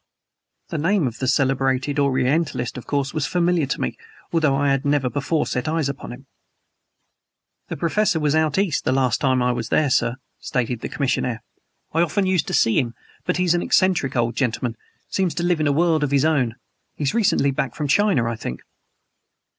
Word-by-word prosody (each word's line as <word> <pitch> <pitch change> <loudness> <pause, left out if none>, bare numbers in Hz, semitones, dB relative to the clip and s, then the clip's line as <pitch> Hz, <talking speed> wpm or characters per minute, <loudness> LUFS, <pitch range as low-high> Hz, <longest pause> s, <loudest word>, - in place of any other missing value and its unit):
The 165 - -3
name 180 +1 +2
of 120 -2 -4
the 130 - -1
celebrated 135 +1 +1
Orientalist 135 -1 0
of 125 - -8
course 140 -2 -1
was 155 -2 -1
familiar 175 -4 +1
to - - -2
me, 65 - -3 0.3
although 155 -5 +3
I 140 0 +2
had 135 0 +1
never 140 -3 +1
before 145 +2 0
set 125 +2 -3
eyes 155 -2 0
upon 140 - -6
him. 130 +3 -11 1.4
"The - - -5
Professor 170 +3 +1
was 150 -2 +1
out 155 0 +1
East 195 -6 +1
the - - +1
last 130 -2 +1
time 130 -3 +2
I 125 - +2
was 120 -2 -3
there, 150 -3 +2
sir," 120 - +2 0.2
stated 125 -2 -2
the - - -5
commissionaire. 125 -4 -1 0.5
"I 165 - +2
often 190 +4 +1
used 185 -4 +1
to - - -4
see 115 - +3
him. 120 -2 -2 0.3
But 180 - 0
he's 180 -2 +2
an 175 - +1
eccentric 175 -10 +2
old 120 -1 0
gentleman. 120 -2 -1 0.3
Seems 190 -3 -1
to 175 - -2
live 175 -2 +1
in 155 - +1
a - - +3
world 160 +1 +2
of 145 - 0
his 140 +1 +2
own. 130 -8 +1 0.4
He's 145 +2 -1
recently 195 -11 +2
back 135 -2 -3
from 150 - -2
China, 190 - +3
I 115 -1 -3
think." 65 - -6
140 Hz, 195 wpm, -22 LUFS, 130-165 Hz, 1.4 s, although